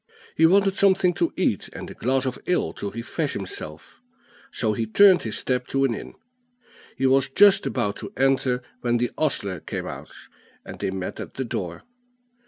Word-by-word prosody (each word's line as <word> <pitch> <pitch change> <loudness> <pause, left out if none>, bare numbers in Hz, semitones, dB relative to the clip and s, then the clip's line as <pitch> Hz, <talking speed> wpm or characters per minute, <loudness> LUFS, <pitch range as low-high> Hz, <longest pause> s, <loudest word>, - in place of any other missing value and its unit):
He 160 - +6
wanted 195 +2 +3
something 190 -2 +4
to 170 -1 0
eat, 145 - 0
and - - -7
a - - -8
glass 130 +2 0
of 130 -1 -3
ale 180 - +1
to 100 - -5
refresh 115 - -3
himself; 80 -5 -8 0.5
so 110 -2 -1
he 115 +1 -2
turned 190 - +6
his 110 - -3
steps 125 -1 -1
to 135 0 +2
an 135 -4 +2
inn. - - -8 0.8
He 135 - 0
was 135 0 +3
just 200 +8 +5
about 100 0 -1
to - - -7
enter 130 -1 +2 0.2
when 120 -1 +1
the 120 0 -1
ostler 100 - -1
came - - -5
out, - - -8 0.6
and - - -9
they - - -1
met 95 -1 -5
at - - -8
the 130 - -3
door. 90 -7 -5
130 Hz, 185 wpm, -24 LUFS, 110-160 Hz, 0.8 s, He